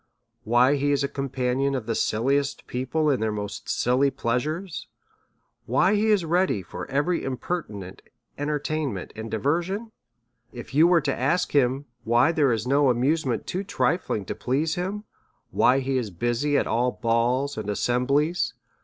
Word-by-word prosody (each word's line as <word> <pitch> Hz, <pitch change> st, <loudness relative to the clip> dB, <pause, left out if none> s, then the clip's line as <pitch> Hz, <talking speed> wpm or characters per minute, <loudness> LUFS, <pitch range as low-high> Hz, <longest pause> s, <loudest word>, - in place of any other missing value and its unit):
why 125 Hz, +5 st, +4 dB
he 145 Hz, +1 st, +1 dB
is 140 Hz, -1 st, +1 dB
a -, -, +1 dB
compa 135 Hz, -3 st, -2 dB
nion 140 Hz, +1 st, +1 dB
of 120 Hz, -, -6 dB
the 115 Hz, -, -1 dB
silliest 135 Hz, +7 st, 0 dB
people 130 Hz, +5 st, -1 dB
in 130 Hz, -, +1 dB
their 110 Hz, 0 st, 0 dB
most 105 Hz, -1 st, -5 dB
silly 130 Hz, +3 st, +2 dB
pleasures? 150 Hz, +9 st, -3 dB, 0.8 s
why 190 Hz, -, +3 dB
he 210 Hz, +1 st, +2 dB
is 205 Hz, -5 st, +3 dB
ready 175 Hz, -, +1 dB
for 85 Hz, -, -8 dB
every 150 Hz, +6 st, 0 dB
impertinent 125 Hz, -, -5 dB, 0.3 s
entertainment 145 Hz, -, -3 dB
and 110 Hz, +1 st, -6 dB
diversion? 175 Hz, -, -1 dB, 0.6 s
If 120 Hz, +2 st, -9 dB
you 155 Hz, +4 st, +6 dB
were 175 Hz, -2 st, +4 dB
to 140 Hz, -2 st, -1 dB
ask 155 Hz, +9 st, 0 dB
him 135 Hz, 0 st, +2 dB, 0.2 s
why 120 Hz, +7 st, +4 dB
there 150 Hz, -5 st, +2 dB
is 115 Hz, -1 st, -1 dB
no 140 Hz, +1 st, +4 dB
amusement 130 Hz, +1 st, +1 dB
too 185 Hz, +2 st, -3 dB
trifling 170 Hz, -, -1 dB
to -, -, -3 dB
please 150 Hz, +6 st, -1 dB
him? 195 Hz, +4 st, -3 dB, 0.5 s
why 130 Hz, +3 st, +3 dB
he 130 Hz, 0 st, 0 dB
is 115 Hz, -4 st, -4 dB
busy 120 Hz, -, 0 dB
at -, -, +1 dB
all 125 Hz, +2 st, +1 dB
balls 120 Hz, +4 st, 0 dB
and 110 Hz, -1 st, -5 dB
assemblies? 140 Hz, -, +1 dB
135 Hz, 160 wpm, -25 LUFS, 120-155 Hz, 0.8 s, you